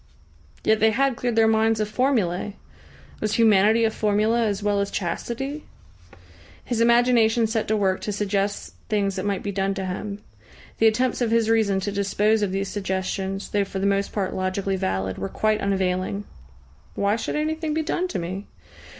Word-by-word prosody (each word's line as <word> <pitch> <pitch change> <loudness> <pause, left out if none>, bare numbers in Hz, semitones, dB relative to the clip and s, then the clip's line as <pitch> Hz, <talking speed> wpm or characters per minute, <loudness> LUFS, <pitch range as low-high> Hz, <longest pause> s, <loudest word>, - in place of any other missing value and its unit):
Yet 220 0 +3
they 220 - +5
had 265 +3 +1
cleared 240 -1 -2
their 225 0 +5
minds 220 0 +2
of 215 - 0
formulae! 210 -6 0 0.6
Was 215 0 -1
humanity 220 0 +4
a 220 - +1
formula 215 +2 +1
as 205 0 -2
well 205 -1 +1
as 200 0 -1
chastity? 240 - -4 1.0
His 235 -2 -1
imagination 235 -1 +4
set 220 0 -1
to 220 - +1
work 190 -2 +1
to 210 - -3
suggest 200 0 -2 0.2
things 200 -2 0
that 190 +1 -3
might 200 -2 -1
be 205 - -2
done 195 0 -1
to 190 -1 -3
him. 200 +3 -5 0.6
The 225 - +6
attempts 250 +4 +1
of 240 - +2
his 225 -1 +2
reason 210 -4 +2
to 205 - -2
dispose 205 +2 +1
of 200 -2 0
these 195 +1 -2
suggestions, 190 0 -3
though 205 -1 +1
for 195 0 -6
the 195 - -1
most 200 0 +1
part 195 -3 -2
logically 190 +1 -1
valid, 95 - -2
were 95 0 -3
quite 215 0 0
unavailing. 190 0 -1 0.7
"Why 200 +1 +1
should 230 - -3
anything 310 0 -1
be 320 - 0
done 355 +4 -1
to 360 - -4
me?" 185 +4 -5
210 Hz, 180 wpm, -24 LUFS, 195-225 Hz, 1.0 s, The